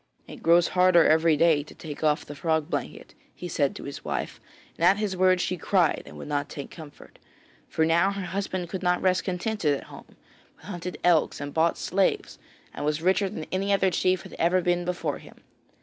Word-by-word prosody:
'It - - -11
grows 170 +1 +4
harder 180 -2 +5
every 160 0 +4
day 160 -2 +4
to 145 - -13
take 155 -1 -8
off 150 -1 +1
the 145 - -8
frog 160 +1 -1
blanket,' - - -5 0.2
he 180 - -7
said 145 -5 0
to - - -8
his 140 - -8
wife, - - -4 0.3
and - - -5
at 185 +4 +5
his 210 -3 -2
words 185 0 +3
she 180 - -2
cried 175 -3 +1
and - - -11
would - - -8
not 145 -1 -2
take 140 - -8
comfort. 155 -4 -13 0.5
For 160 - +1
now 170 +4 +3
her 200 -1 -4
husband 185 -1 -3
could 185 +2 -5
not 180 -1 +1
rest 185 -1 +1
contented 180 -4 -1
at - - -10
home, - - -13 0.4
but - - -20
hunted 180 -2 -6
elks 175 -3 +3
and 145 0 -6
bought 165 +1 +2
slaves 190 +1 -1 0.3
and - - -6
was 150 +2 -1
richer 190 +2 +2
than 155 - -6
any 195 +2 -1
other 195 -1 +3
chief 185 +1 +1
had - - -12
ever 175 +2 +3
been 175 0 0
before 175 -5 -3
him. - - -15
175 Hz, 210 wpm, -26 LUFS, 160-185 Hz, 0.5 s, harder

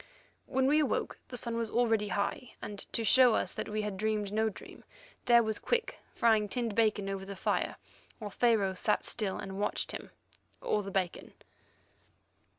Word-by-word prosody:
When 265 -1 +1
we 295 +3 +4
awoke 300 - -1
the 250 - -6
sun 235 -1 -3
was 230 -1 -1
already 225 -3 +2
high, 205 +4 -2
and 205 -1 -7
to 230 - 0
show 250 0 +6
us - - 0
that - - -4
we 215 0 -1
had 210 -2 -3
dreamed 210 -1 -1
no 220 +1 +2
dream, 205 - -12 0.4
there 235 -1 +6
was 220 -1 -2
Quick 480 0 -1 0.2
frying 220 -4 +3
tinned 235 -2 -2
bacon 215 -2 +2
over 195 -1 -3
the 195 +1 -7
fire, - - 0 0.4
while 210 -2 -6
Pharaoh 215 -4 +2
sat 185 - +1
still 205 -4 -2
and 195 0 -6
watched 205 - -1
him—or 210 - -5
the 195 - -6
bacon. 185 -2 -2
215 Hz, 170 wpm, -31 LUFS, 200-235 Hz, 0.4 s, show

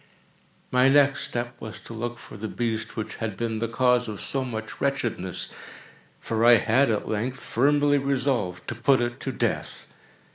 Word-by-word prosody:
My 125 +1 +5
next 140 0 +4
step 120 0 -4
was 110 - -7
to - - -10
look 120 +1 -4
for 120 - -12
the 110 +1 -5
beast 115 -1 -3
which 110 - -4
had 110 -4 -4
been 115 -1 -2
the 115 - -1
cause 125 +1 +2
of 105 -3 -5
so 135 -1 -2
much 110 -3 -6
wretchedness; 120 -10 -1 0.7
for 115 0 -1
I 120 +1 +8
had, 120 +5 +3
at 110 -2 -1
length, 120 +5 -2
firmly 145 +3 +2
resolved 130 -9 -1
to - - -2
put 130 +3 +3
it 120 +1 -2
to 135 - -3
death. - - -2
120 Hz, 175 wpm, -26 LUFS, 110-135 Hz, 0.7 s, I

